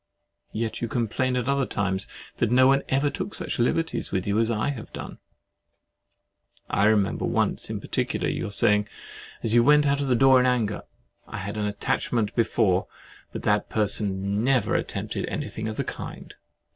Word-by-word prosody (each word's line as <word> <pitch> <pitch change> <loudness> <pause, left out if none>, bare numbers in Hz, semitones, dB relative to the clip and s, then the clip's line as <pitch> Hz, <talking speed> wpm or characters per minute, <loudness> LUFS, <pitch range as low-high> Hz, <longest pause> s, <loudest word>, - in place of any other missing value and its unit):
Yet 110 0 -3
you 120 - -1
complain 120 +2 -1
at 125 -1 -1
other 140 -1 +1
times 95 -1 -1 0.3
that 115 - +1
no 130 +2 +5
one 135 +1 +4
ever 140 +2 +2
took - - -5
such - - -4
liberties 160 +7 0
with 95 -2 -1
you 100 +2 +1
as 115 0 +2
I 110 +3 0
have 125 -6 -6
done. - - -8 1.5
I 100 - +1
remember 105 -2 +2
once - - 0
in - - -3
particular - - -2
your - - -2
saying, 105 +1 +2 0.6
as 115 - 0
you 120 0 +6
went 150 +2 +5
out 140 0 +2
at 140 - -1
the 125 - +3
door 130 +1 +6
in 125 - +3
anger—"I 115 -5 -4
had 100 +2 -5
an 105 -1 -1
attachment 110 +1 -1
before, 105 -5 +2 0.4
but - - -6
that 105 0 +1
person 100 -1 0
never 130 -1 +2
attempted - - -2
anything 110 0 -4
of 110 - -5
the - - 0
kind." - - -7
115 Hz, 170 wpm, -25 LUFS, 105-130 Hz, 1.5 s, you